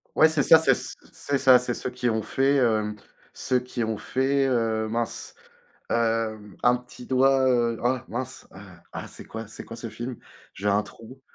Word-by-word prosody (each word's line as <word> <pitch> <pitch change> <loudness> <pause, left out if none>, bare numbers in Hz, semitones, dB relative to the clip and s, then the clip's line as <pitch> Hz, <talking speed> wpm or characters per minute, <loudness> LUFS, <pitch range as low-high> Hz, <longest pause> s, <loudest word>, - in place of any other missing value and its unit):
Ouais, 160 - +6
c'est 155 -3 +1
ça, 160 - +8
c'est 160 - +4
c - - -5 0.2
c'est 140 - -2
ça, 130 -2 +6
c'est 125 0 -3
ceux - - -4
qui 125 - -1
ont 110 -1 0
fait, 135 +6 +1
hem, 110 -5 +1 0.4
ceux 125 - 0
qui 125 -1 -4
ont 110 -1 -2
fait, 135 +4 +1
heu, 115 -3 0
mince, 115 +1 -4 0.6
hem, 115 -3 -1
un 120 0 +5
petit 125 0 -13
doigt, 135 0 +3
heu, 120 -2 +1
ah 125 +1 +1
mince, 125 +2 -6
ah, - - -14
ah, - - -6
c'est - - -11
quoi 110 0 -7
c'est 110 - -10
quoi 115 - -9
ce 115 0 -6
film? 120 +3 -6 0.4
J'ai 105 +1 -2
un 100 +1 +3
trou, 125 +6 -14
120 Hz, 195 wpm, -25 LUFS, 110-130 Hz, 0.6 s, ça